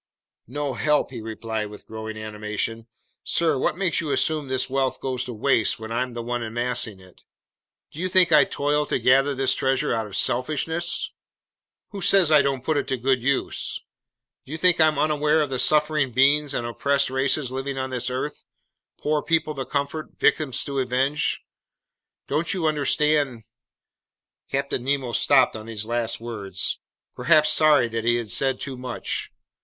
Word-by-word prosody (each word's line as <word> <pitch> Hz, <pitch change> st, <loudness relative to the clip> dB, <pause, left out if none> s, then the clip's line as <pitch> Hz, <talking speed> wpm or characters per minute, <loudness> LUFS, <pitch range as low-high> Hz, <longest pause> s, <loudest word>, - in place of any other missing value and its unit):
"No 145 Hz, +2 st, -3 dB
help!" 150 Hz, +2 st, +1 dB
he 120 Hz, -4 st, -7 dB
replied 110 Hz, -1 st, -4 dB
with 105 Hz, -, -12 dB
growing 110 Hz, 0 st, -7 dB
animation. 110 Hz, +1 st, -4 dB, 0.4 s
"Sir, 165 Hz, -3 st, +1 dB
what 155 Hz, -, 0 dB
makes 185 Hz, -4 st, 0 dB
you 155 Hz, -, -4 dB
assume 155 Hz, 0 st, 0 dB
this 130 Hz, 0 st, -1 dB
wealth 135 Hz, 0 st, -1 dB
goes 130 Hz, -1 st, -3 dB
to 125 Hz, -, -6 dB
waste 115 Hz, -1 st, +1 dB
when 110 Hz, 0 st, -8 dB
I'm 125 Hz, +1 st, -2 dB
the 120 Hz, -, -4 dB
one 120 Hz, +1 st, -3 dB
amassing 115 Hz, -2 st, -2 dB
it? 95 Hz, -1 st, -18 dB, 0.7 s
Do 150 Hz, -, -11 dB
you 185 Hz, +1 st, -1 dB
think 180 Hz, -2 st, +4 dB
I 150 Hz, -2 st, +7 dB
toil 145 Hz, +2 st, -1 dB
to -, -, 0 dB
gather 135 Hz, +2 st, +3 dB
this 130 Hz, 0 st, +2 dB
treasure 135 Hz, -2 st, 0 dB
out 110 Hz, -2 st, -2 dB
of 100 Hz, -, -8 dB
selfishness? 155 Hz, +7 st, 0 dB, 0.8 s
Who 200 Hz, -2 st, -7 dB
says 185 Hz, -3 st, +4 dB
I 150 Hz, -2 st, +7 dB
don't 135 Hz, -2 st, -1 dB
put 155 Hz, +2 st, 0 dB
it 145 Hz, -, -1 dB
to 130 Hz, -, -1 dB
good 130 Hz, +1 st, +1 dB
use? 135 Hz, +2 st, -1 dB, 0.6 s
Do 130 Hz, -, -14 dB
you 155 Hz, -, -3 dB
think 175 Hz, 0 st, +5 dB
I'm 155 Hz, -2 st, +4 dB
unaware 150 Hz, +1 st, +2 dB
of 150 Hz, -3 st, -1 dB
the 130 Hz, -, -1 dB
suffering 150 Hz, -2 st, +3 dB
beings 140 Hz, +3 st, +3 dB
and 120 Hz, -, -2 dB
oppressed 140 Hz, +3 st, 0 dB
races 135 Hz, 0 st, 0 dB
living 135 Hz, +1 st, -4 dB
on 130 Hz, 0 st, -3 dB
this 125 Hz, 0 st, -1 dB
earth, 130 Hz, +4 st, -4 dB, 0.5 s
poor 150 Hz, 0 st, 0 dB
people 160 Hz, -1 st, 0 dB
to 135 Hz, -2 st, -5 dB
comfort, 140 Hz, +2 st, -4 dB
victims 135 Hz, -5 st, +1 dB
to 140 Hz, -1 st, -3 dB
avenge? 130 Hz, +3 st, 0 dB, 0.8 s
Don't 160 Hz, +6 st, 0 dB
you 175 Hz, -4 st, -2 dB
understand... 150 Hz, -4 st, +1 dB, 0.5 s
?" -, -, -56 dB
Captain 135 Hz, -2 st, -2 dB
Nemo 135 Hz, -2 st, -1 dB
stopped 130 Hz, +1 st, +3 dB
on 110 Hz, 0 st, -8 dB
these 110 Hz, -2 st, -4 dB
last 115 Hz, 0 st, -1 dB
words, 100 Hz, -5 st, -3 dB, 0.3 s
perhaps 155 Hz, -2 st, +3 dB
sorry 150 Hz, -6 st, +4 dB
that 115 Hz, 0 st, -3 dB
he 120 Hz, +1 st, +3 dB
had 115 Hz, -4 st, -3 dB
said 135 Hz, +3 st, +1 dB
too 135 Hz, -2 st, -4 dB
much. 125 Hz, -1 st, -4 dB
135 Hz, 175 wpm, -24 LUFS, 120-150 Hz, 0.8 s, I